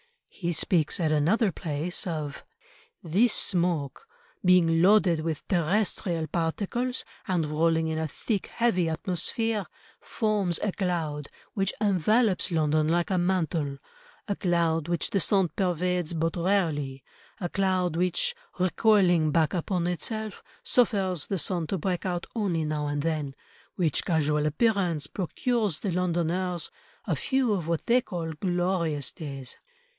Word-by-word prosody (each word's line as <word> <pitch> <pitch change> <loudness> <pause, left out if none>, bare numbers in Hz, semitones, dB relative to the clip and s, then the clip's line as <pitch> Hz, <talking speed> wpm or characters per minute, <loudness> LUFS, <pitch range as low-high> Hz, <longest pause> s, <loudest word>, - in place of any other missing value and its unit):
He 175 -2 -3
speaks 165 -1 +1
at 160 -3 +1
another 185 +9 +2
place 160 +3 -2
of— 150 -4 -4 0.6
"This 200 +9 +3
smoke 175 - 0 0.4
being 170 -3 +4
loaded 185 -3 +5
with 155 -1 -4
terrestrial 175 -2 0
particles 200 - -2 0.2
and 180 -5 +1
rolling 160 +2 +1
in 160 0 -2
a 160 - -1
thick, 200 - -3
heavy 185 -8 +1
atmosphere, 195 +6 -1 0.3
forms 205 -6 0
a 210 - +1
cloud, 165 -7 -2 0.2
which 195 -1 0
envelopes 210 +1 +2
London 155 -2 +2
like 170 +3 +1
a 185 - +2
mantle, 165 -6 0 0.5
a 200 - -1
cloud 170 -4 +1
which 170 -2 -1
the 200 - +2
sun 190 +1 +2
pervades 180 -2 0
but 165 0 -1
rarely, 160 -8 0 0.4
a 180 - -2
cloud 185 -3 0
which, 180 - +1 0.2
recoiling 185 -3 +3
back 155 0 +2
upon 180 0 -1
itself, 210 +5 -3 0.2
suffers 195 - +2
the 195 - -1
sun 175 -1 -1
to 195 - -1
break 185 +2 -2
out 175 -1 -2
only 180 -8 0
now 150 -1 -2
and 145 0 -2
then, 155 -4 -2 0.4
which 165 -6 +1
casual 150 -3 +1
appearance 175 - +1
procures 205 - -1
the 200 - -1
Londoners 175 0 0 0.3
a - - 0
few 260 -5 +1
of 175 -5 -2
what 165 -1 -1
they 245 +2 +4
call 170 -8 -5
glorious 175 -3 0
days." 140 -6 -6
175 Hz, 135 wpm, -27 LUFS, 160-195 Hz, 0.6 s, loaded